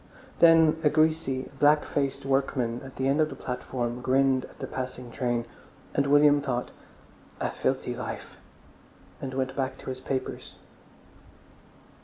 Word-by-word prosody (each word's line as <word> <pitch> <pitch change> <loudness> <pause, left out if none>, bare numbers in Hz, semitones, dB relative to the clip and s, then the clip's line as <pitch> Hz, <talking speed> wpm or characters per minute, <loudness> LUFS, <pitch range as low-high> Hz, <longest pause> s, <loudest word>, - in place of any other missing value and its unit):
Then 160 -1 +6
a 150 - +5
greasy, 155 -4 +1
black 150 +1 +5
faced 140 -1 -2
workman 135 -3 0
at 135 -1 -11
the 130 - -1
end 140 +3 +3
of 155 - +2
the - - -7
platform 125 -1 -4
grinned 130 0 +2
at - - -17
the - - -5
passing 125 -1 -6
train. 120 -2 -1 0.5
And 140 0 +1
William 145 0 +5
thought, 125 -3 -2 0.7
"A - - -1
filthy - - -1
life!" - - -6 0.9
and 130 -1 -5
went 130 0 -2
back 135 -1 -2
to - - -8
his 130 - -6
papers. 130 0 -4
135 Hz, 145 wpm, -27 LUFS, 130-145 Hz, 0.9 s, Then